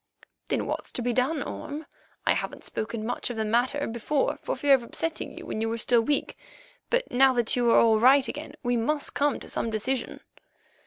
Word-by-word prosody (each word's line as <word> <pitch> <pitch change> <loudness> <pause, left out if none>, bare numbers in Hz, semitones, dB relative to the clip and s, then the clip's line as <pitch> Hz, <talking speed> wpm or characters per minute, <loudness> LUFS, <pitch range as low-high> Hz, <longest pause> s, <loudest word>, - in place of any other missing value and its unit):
"Then - - -1
what's - - -4
to 245 - -2
be 245 0 0
done, 275 +5 +1
Orme? 295 +2 -6 0.4
I - - +4
haven't - - -4
spoken 215 0 -4
much 245 +1 -2
of 240 - -5
the 220 - 0
matter 250 +6 +1
before 235 +5 -1
for - - -2
fear 285 -1 +4
of 265 - +5
upsetting 325 +7 -4
you - - -8
when 215 - -4
you 225 - 0
were 230 - -2
still 235 +1 +4
weak, 285 +5 -1 0.5
but - - 0
now 265 +1 +5
that 240 -2 +1
you 240 -1 +2
are - - +6
all 220 -1 +5
right 260 +3 +6
again 300 +2 -6
we 245 0 +1
must 290 +6 -1
come 285 0 +1
to - - -11
some 230 - -1
decision." 235 +5 -2
245 Hz, 210 wpm, -27 LUFS, 230-285 Hz, 0.5 s, are